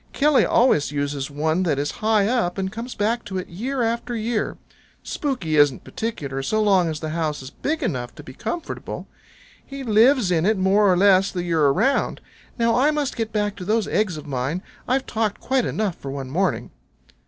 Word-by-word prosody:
Killy 295 -1 +4
always 195 - +3
uses 145 -1 -2
one 155 +4 0
that 160 -6 +1
is 145 +1 -1
high 215 -2 +3
up, 225 -7 0
and 190 -1 -2
comes 235 +4 -6
back 225 +3 0
to 195 -2 -4
it 185 - -4
year 245 +8 -2
after 235 +1 -1
year. 225 0 -2 0.5
Spooky 245 - -2
isn't 145 -3 +4
particular 150 - -4
so 215 +11 0
long 195 -5 +3
as 155 -2 -4
the 155 - -3
house 155 -4 -2
is 130 - -9
big 310 - -2
enough 125 -6 -3
to - - -11
be 130 - -11
comfortable. 340 - -5 0.6
He 275 0 -8
lives 230 -1 +4
in 165 -2 +2
it 215 +3 +2
more 195 +1 +4
or 180 - +3
less 195 0 +5
the 180 -2 -3
year 165 -4 +2
around. 265 - +1 0.4
Now 230 -1 +2
I 270 +4 +4
must 300 -3 -1
get 225 -2 -3
back 205 -1 -1
to 185 - -6
those 215 +3 +1
eggs 205 -6 0
of 150 - -9
mine. 140 +6 -2 0.2
I've 260 +1 +1
talked 220 -2 -1
quite 260 -2 0
enough 205 -5 -1
for 140 - -7
one 135 -1 -5
morning." 190 +6 0
195 Hz, 200 wpm, -23 LUFS, 155-230 Hz, 0.6 s, less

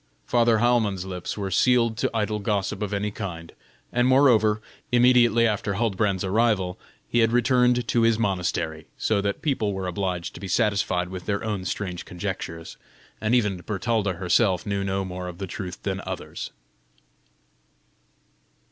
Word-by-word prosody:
Father 115 -2 +3
Heilmann's 110 -5 +1
lips 90 0 -5
were 100 -2 -3
sealed 115 +3 +3
to - - 0
idle 105 -1 -1
gossip 100 -1 -1
of 105 -1 -2
any 105 +1 -1
kind, 85 -6 -6 0.4
and 125 +1 +3
moreover, 120 -6 +4 0.3
immediately 120 -1 +5
after 105 -2 0
Huldbrand's 100 -3 0
arrival, 100 -2 +1 0.3
he 120 - +1
had 115 0 +4
returned 125 0 +3
to 120 - +3
his 115 -1 +4
monastery; 85 -6 -1
so 105 -2 +1
that 100 0 -3
people 115 -9 0
were 95 -1 -4
obliged 90 -1 -3
to - - -10
be 100 - -6
satisfied 100 -4 +1
with 90 -1 -8
their 100 -1 -1
own 105 -4 -3
strange 90 -3 -3
conjectures, 90 -3 -6 0.4
and 110 +2 +2
even 105 -6 +2
Bertalda 105 0 -1
herself 90 +2 +1
knew 100 -1 -1
no 95 0 -1
more 90 0 -5
of 90 -1 -7
the 95 - -4
truth 90 -1 -6
than 95 -1 -2
others. - - -6
100 Hz, 155 wpm, -25 LUFS, 95-115 Hz, 0.4 s, immediately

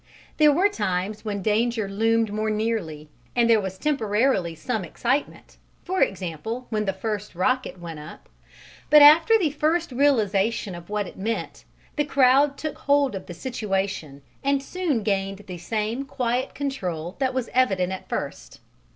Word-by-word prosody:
There 300 -1 +6
were 355 +8 +4
times 205 - -2
when 205 -3 -3
danger 220 +1 +1
loomed 225 +2 +1
more 215 +1 -1
nearly 210 -9 -2 0.3
and 240 -1 +3
there 225 -2 +5
was 190 -1 -5
temporarily 220 - +1
some 210 +6 -3
excitement, 245 - -3 0.3
for 375 +1 -2
example 195 +7 -2
when 215 -1 0
the 195 - +1
first 210 0 -5
rocket 255 +4 0
went 165 -3 -7
up, 150 - -11 0.6
but 300 -1 +8
after 325 +10 +8
the 335 -8 0
first 320 +2 0
realization 225 -6 +1
of 175 +1 -10
what 210 -1 -1
it - - -11
meant, 225 +4 -4 0.3
the 295 - +3
crowd 275 0 +4
took 310 -2 -5
hold 285 -2 +2
of 190 -1 -7
the 175 - -8
situation 195 - -3 0.2
and 275 0 +1
soon 310 - -1
gained 195 0 -1
the 180 -3 -8
same 220 +7 -2
quiet 255 -1 -2
control 185 - -4
that 260 -1 0
was 255 -3 -2
evident 195 -8 +2
at 190 - -8
first. - - -5
220 Hz, 160 wpm, -24 LUFS, 195-270 Hz, 0.6 s, but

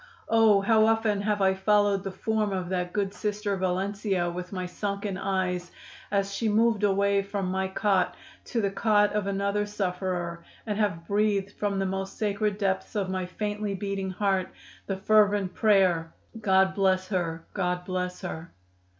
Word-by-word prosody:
Oh! 220 -3 +5
how 220 +2 +4
often 225 -2 +2
have 205 -1 0
I 190 0 +4
followed 200 0 +2
the 195 - -3
form 215 +2 -1
of 185 -2 -3
that 180 -1 -2
good 200 -1 -1
Sister 210 -1 -2
Valencia 190 0 -1
with 180 +1 -6
my 185 -2 -3
sunken 200 +1 -3
eyes 185 -2 -1 0.4
as 200 -1 0
she 220 +2 0
moved 220 0 +3
away 200 0 +3
from 200 0 -3
my 190 0 0
cot 190 0 +1 0.3
to 235 - -1
the 200 -2 0
cot 210 0 +3
of 210 -2 -1
another 200 +1 0
sufferer 180 -4 -3 0.2
and 210 -2 -2
have 170 -6 -1
breathed 205 -1 +1
from 205 -1 -2
the 195 - 0
most 190 0 -3
sacred 210 -1 0
depths 195 0 -1
of 195 -3 -1
my 185 -1 -2
faintly 205 +1 -3
beating 195 0 -3
heart 190 -1 0 0.4
the 195 - -2
fervent 205 -2 +3
prayer: 185 -6 +3 0.3
'God 190 -2 +3
bless 190 -1 +1
her! 165 -4 -2
God 180 -2 -1
bless 180 -1 -3
her! 165 -3 -6
195 Hz, 165 wpm, -27 LUFS, 185-205 Hz, 0.4 s, Oh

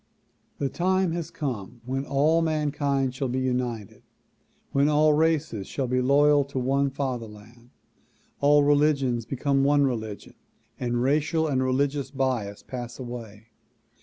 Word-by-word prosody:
The 140 - -1
time 185 +3 +1
has 170 -1 -4
come 120 -4 -5
when 135 +2 -2
all 150 +4 +3
mankind 145 -4 0
shall 135 +1 -2
be 125 +1 -2
united, 125 -5 -3 0.7
when 140 +2 +3
all 150 0 +4
races 155 -9 0
shall 135 - -2
be 125 +1 0
loyal 145 +2 +4
to 140 -1 -7
one 135 +2 +1
father 130 -4 -3
land, 115 +3 -16 0.7
all 145 +1 +5
religions 145 -5 +2
become 135 +1 0
one 145 +1 +4
religion 110 -5 -4 0.5
and 120 -1 -1
racial 155 +4 +1
and 135 -3 0
religious 140 +2 0
bias 125 -7 -2
pass 120 -2 -7
away. 115 -3 -9
135 Hz, 135 wpm, -26 LUFS, 120-145 Hz, 0.7 s, all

